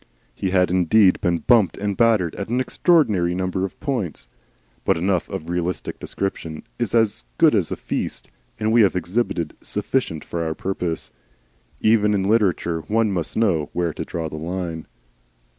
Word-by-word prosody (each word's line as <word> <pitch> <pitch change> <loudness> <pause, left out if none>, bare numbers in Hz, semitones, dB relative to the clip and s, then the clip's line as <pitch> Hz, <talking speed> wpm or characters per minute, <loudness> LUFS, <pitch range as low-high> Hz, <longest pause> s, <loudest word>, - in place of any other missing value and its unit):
He 95 - -2
had 90 -1 +2
indeed 95 +2 +4
been 85 -1 +2
bumped 115 -6 +4
and 100 0 -2
battered 110 -8 +3
at 100 +1 -5
an 120 +2 +1
extraordinary 110 - +2
number 95 0 -1
of 95 - -8
points. 105 - -3 0.6
But - - +2
enough 90 +1 0
of 80 - -5
realistic 90 0 -3
description 80 -5 -4 0.2
is - - -1
as 110 - +2
good - - +5
as - - +1
a - - 0
feast, - - -4 0.3
and 110 0 +1
we 115 +1 +6
have 100 -3 +4
exhibited 90 -3 -1
enough 105 -6 -2
for 85 -1 -3
our 80 -1 -2
purpose. 90 -4 -3 0.7
Even 105 -1 +4
in 95 - +1
literature 95 -5 +1
one 110 0 +2
must 85 -5 -3
know 90 -10 +1
where 85 -2 -1
to - - -4
draw 80 -1 -4
the 75 - -7
line. 85 0 -4
95 Hz, 165 wpm, -22 LUFS, 85-110 Hz, 0.7 s, we